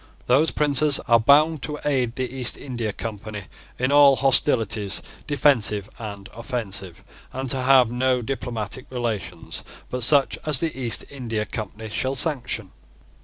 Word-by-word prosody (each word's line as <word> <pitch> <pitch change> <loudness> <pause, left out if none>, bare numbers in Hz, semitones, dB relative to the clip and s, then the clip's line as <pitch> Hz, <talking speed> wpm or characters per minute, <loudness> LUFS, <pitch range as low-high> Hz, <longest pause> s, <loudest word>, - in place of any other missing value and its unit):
Those 140 +6 +3
princes 145 -1 +2
are 115 -2 +4
bound 150 +5 +4
to 150 +4 -4
aid 130 -5 0
the 130 0 -2
East 125 -2 +1
India 120 -5 -4
Company 105 -1 -6 0.3
in 130 +2 0
all 145 -1 +7
hostilities, 115 -7 +2 0.3
defensive 120 -8 +2
and 100 -3 -7
offensive, 100 -7 -4 0.3
and 135 +1 -5
to 135 -2 -1
have 130 -2 +5
no 125 0 +1
diplomatic 120 -1 -4
relations 110 -9 -4 0.3
but 125 - -3
such 140 +3 +3
as 150 -4 +2
the 165 -2 -2
East 120 -5 -1
India 115 -6 -3
Company 110 +1 -6
shall 130 +5 -2
sanction. 125 - -1
125 Hz, 140 wpm, -23 LUFS, 110-135 Hz, 0.3 s, all